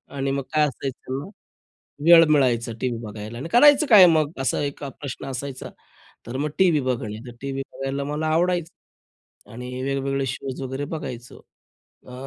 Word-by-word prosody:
आणि 135 0 -1
मग 140 0 -2
काय 155 -1 +4
असायचं, 135 +2 -6 0.8
वेळ 165 0 +9
मिळायचा 125 -6 +2
टीव्ही 125 -3 -2
बघायला 110 +1 -8
आणि 140 - -6
करायचं 290 - +6
काय 210 -8 +9
मग 155 -3 +3
असा 135 -4 0
एक 140 0 -5
अ, - - -4
प्रश्न 135 -1 -6
असायचा. 135 0 -6 0.6
तर 120 +3 -5
मग 150 +3 -2
टीव्ही 175 -5 +4
बघणे. 115 -5 -3
तर 120 - -10
टीव्ही 135 0 -4
बघायला 135 +1 -3
मला 150 +2 -3
आवडायचं 170 +1 -4
आणि 125 +2 -6
वेगवेगळे 135 0 -1
शोज 135 +1 -5
वगैरे 130 +2 -4
बघायचो. 125 -6 -7 0.7
अ, 125 - -11
135 Hz, 155 wpm, -23 LUFS, 125-155 Hz, 0.8 s, वेळ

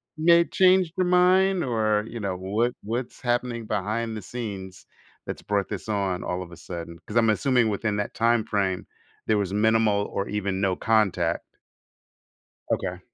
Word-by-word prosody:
you 155 +1 -5
may 170 0 +7
change 185 -2 +4
your 185 - +2
mind 180 +1 +4
or, 110 -4 +1
you 115 0 -7
know, 100 -3 -2
what 110 +6 0
what's 120 +3 -4
happening 120 -2 -1
behind 110 +3 -2
the - - -6
scenes 95 -4 -7 0.4
that's - - -5
brought 100 -2 -1
this 100 0 -5
on 95 -3 -1
all 90 +1 -3
of 85 - -13
a 85 - -11
sudden?" 85 0 -7
'Cause 110 - -2
I'm 115 -1 +4
assuming 120 +1 +2
within 105 0 -1
that 105 - -3
time 115 -1 +3
frame, 95 -4 -1 0.4
there 110 -1 +3
was 100 -1 -1
minimal 105 -1 +3
or 100 - -3
even 100 -2 -2
no 95 -2 +1
contact. 100 -7 +1 1.3
Okay. 90 -1 -1
110 Hz, 170 wpm, -25 LUFS, 100-120 Hz, 1.3 s, may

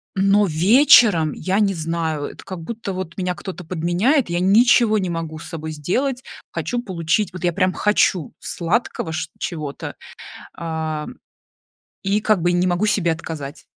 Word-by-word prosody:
но 195 +2 +4
вечером 185 - +5
я 190 +2 -1
не 200 -2 +2
знаю, 160 -2 -2
это - - -9
как 185 -3 -6
будто, 215 +1 -5
вот, 185 -2 -6
меня 180 -1 -1
кто-то 180 0 -8
подменяет, 180 - +1
я 175 0 0
ничего 220 +3 +4
не 185 -2 -2
могу 165 -2 -4
с - - -10
собой 160 -2 -6
сделать, 250 - -1 0.3
хочу 245 -1 -2
получить, 175 0 -1
вот, 185 - -8
я 175 - +2
прям 185 +1 +1
хочу 195 -6 +1
сладкого 170 -1 -2
чт 155 - -4
чего-то, 150 -4 -5 0.6
а, 160 -2 -3 1.0
и, 205 +2 +1
как 215 -5 +2
бы, 175 - +3
и - - 0
не 175 +1 +2
могу 175 +4 +1
себе 195 -5 +2
отказать. 160 -2 -6
180 Hz, 160 wpm, -21 LUFS, 165-205 Hz, 1.0 s, вечером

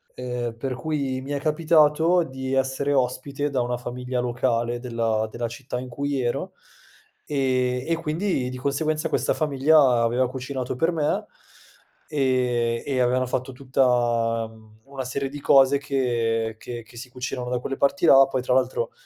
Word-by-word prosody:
ehm, 125 -2 -4
per 130 +1 -3
cui 135 -1 -2
mi 135 +2 -7
è 145 - -1
capitato 160 +2 +3
di 130 -2 -5
essere 135 +2 0
ospite 135 +2 -1
da 135 -3 0
una 120 0 -1
famiglia 125 +1 -4
locale 120 -1 0
della 115 -3 -1
della 120 +1 -3
città 125 +1 -6
in 125 0 -7
cui 140 +2 -2
ero, 120 -1 -2 0.7
e 130 -3 0
e 165 - +2
quindi 160 -3 -1
di 130 - -6
conseguenza 155 +4 -1
questa - - +1
famiglia 140 -4 +4
aveva 120 +2 +1
cucinato 130 0 -4
per 165 +7 +1
me 155 -3 0 0.8
e 125 -5 +1
e 135 -2 -1
avevano 125 +1 +2
fatto 130 +2 -2
tutta, 120 -3 +1
mhmm, 110 -1 -19
una 135 -1 -6
serie 135 +2 -3
di 145 +1 -8
cose 135 0 +5
che 115 -5 -1
che 120 -1 -7
che 115 +2 -16
si 125 +2 -8
cucinano 125 0 -5
da 125 0 -1
quelle 135 +2 -4
parti 175 +6 +1
là. 135 -3 +8
Poi 130 -1 -2
tra 125 0 0
l'altro 470 - +1
130 Hz, 165 wpm, -24 LUFS, 120-140 Hz, 0.8 s, là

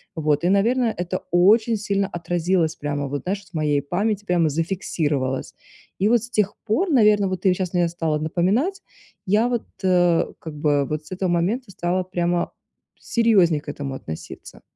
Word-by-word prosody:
Вот 155 0 0
и, 175 - +3
наверное, 230 +5 +2
это 180 +1 -2
очень 215 +6 +4
сильно 200 -1 -1
отразилось 175 -1 0
прямо 145 -1 -3
вот, 140 +1 -4
знаешь, 195 +2 -3
в 180 - -24
моей 150 -2 +1
памяти 205 +7 -1
прямо 175 -4 +2
зафиксировалось. 150 -5 -2 0.5
И 205 +3 +3
вот 240 - +4
с 240 - -8
тех 210 -4 +1
пор, 335 - +1
наверно, 210 - +4
вот 185 -1 -3
ты 190 - +6
вот 180 - +3
щас 185 -2 -3
мне 175 -1 +2
стала 165 -2 -1
напоминать, 195 - 0 0.4
я 210 +5 +3
вот, 240 -2 -1 0.2
э, 175 -2 +3
как 160 -2 -8
бы 145 -1 +2
вот 150 +2 -4
с 155 - -16
этого 185 0 -1
момента 195 +7 0
стала 180 +1 -1
прямо 175 -1 -1 0.5
серьезнее 195 -10 +3
к 145 - -9
этому 140 -2 -5
относиться. 80 -11 -9
180 Hz, 175 wpm, -22 LUFS, 155-205 Hz, 0.5 s, ты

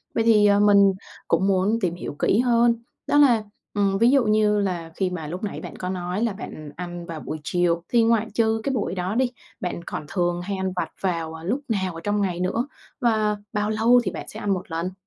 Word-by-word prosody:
Vậy 225 - +2
thì, 215 -2 +5
à, 205 0 +5
mình 200 -1 +6 0.3
cũng 170 +4 +2
muốn 195 +3 +2
tìm 175 -3 0
hiểu 170 - -6
kỹ 210 - +3
hơn, 240 -1 +4 0.3
đó 290 - +3
là, 245 -7 +5 0.3
ừm, 200 -2 +1
ví 230 +4 +5
dụ 275 -2 +4
như 215 -1 +3
là 175 -5 -2
khi 190 -2 0
mà 170 -4 -5
lúc 180 +7 -6
nãy 205 - -3
bạn - - -8
có 180 - -4
nói 180 +2 -3
là 230 -4 0
bạn 155 -6 -8
ăn 175 -1 -6
vào 165 -3 -6
buổi 155 - -5
chiều 170 0 +1
thì 235 -2 +4
ngoại 225 -1 +2
trừ 225 -1 +1
cái 275 - -1
buổi 210 -6 -1
đó 185 +3 -2
đi, 250 0 +2 0.3
bạn 175 -2 -4
còn 155 - -5
thường 175 -1 0
hay 195 +2 -3
ăn 190 -1 -2
vặt 180 - -2
vào, 165 -4 -1
à, 160 - -9
lúc 225 +11 -1
nào 190 -6 -1
ở 165 - -7
trong 205 0 0
ngày 180 -3 -1
nữa? 225 +9 -1 0.3
Và 215 -3 +2 0.2
bao 210 +1 0
lâu 230 +3 +4
thì - - -2
bạn - - -7
sẽ 215 - -8
ăn 205 -2 0
một 185 -2 -5
lần? 170 +3 -2
200 Hz, 240 wpm, -24 LUFS, 180-220 Hz, 0.3 s, mình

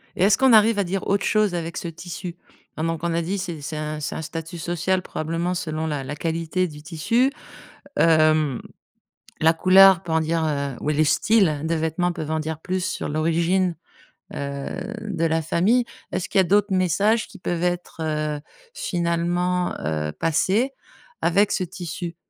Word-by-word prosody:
Et 180 - +1
est-ce 195 0 +5
qu'on 265 -3 +5
arrive 215 0 +5
à - - +3
dire 190 +1 -3
autre 200 0 +1
chose 210 -4 +2
avec 165 -1 -4
ce 170 - -4
tissu? 170 +1 -7 0.4
Hein, 155 - -2
donc 165 -1 -2
on 170 -1 0
a 170 - +1
dit 190 +5 -2
c'est 175 -5 -5
c'est 150 +2 -5
un 150 0 -4
c'est 150 - -4
un - - -4
statut 165 +2 -6
social 175 +3 -1
probablement 165 +2 -2
selon 160 -2 -3
la 145 -3 -2
la 145 +3 -5
qualité 165 +3 -1
du 150 -1 -11
tissu. 230 - +1 0.7
Hem, 155 -4 +3 0.8
la 160 +1 +5
couleur 190 +2 +6
peut 165 -3 -5
en 160 - +3
dire, 160 +1 0
heu, 140 -3 -2
ou - - -4
les 155 +1 +3
styles 160 -4 +3
de 165 +1 0
vêtements 160 +2 0
peuvent 155 -3 -5
en 160 0 0
dire 160 0 -4
plus 185 0 -2
sur 185 - -3
l'origine, 170 +3 +1 0.6
heu, 140 0 -4 0.3
de 195 -6 -2
la 160 0 +1
famille. 205 +10 +2 0.3
Est-ce 185 - -2
qu'il - - 0
y - - +7
a - - -1
d'autres 205 +2 +2
messages 200 +5 +2
qui 200 - -14
peuvent 175 -1 -2
être, 175 0 -2
heu, 155 -1 -1 0.4
finalement, 175 +1 0
heu, 75 0 -2
passés 190 - +1 0.5
avec 195 +4 +3
ce 185 - 0
tissu? 175 -1 -6
170 Hz, 185 wpm, -23 LUFS, 155-185 Hz, 0.8 s, y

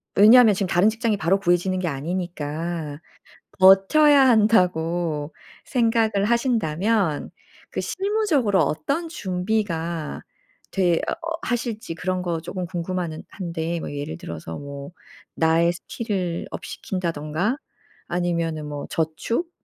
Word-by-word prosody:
왜냐하면 220 +2 +8
지금 195 0 -1
다른 180 +4 +4
직장이 225 -1 0
바로 190 +3 +2
구해지는 175 0 +1
게 180 - -1
아니니까 160 0 -4 0.6
'버텨야 265 +10 +6
한다.'고 175 -8 +2 0.3
생각을 225 -4 +2
하신다면 215 - +1 0.4
그 - - -3
실무적으로 375 - +1
어떤 160 - -1
준비가 180 - -2 0.5
되어 180 -3 +2 0.5
하실지 230 -7 -3
그런 185 +2 -2
거 170 -2 -2
조금 180 +2 -5
궁금한데 170 -1 -4
뭐 - - -6
예를 145 - -5
들어서 80 0 -7
뭐 140 0 -8 0.4
나의 165 +1 +3
스킬을 185 -2 -4
업 - - -7
시킨다든가 175 - -2 0.5
아니면은 170 -3 -1
뭐 145 -1 -5
저축 165 - -1
180 Hz, 260 characters per minute, -23 LUFS, 160-220 Hz, 0.6 s, 왜냐하면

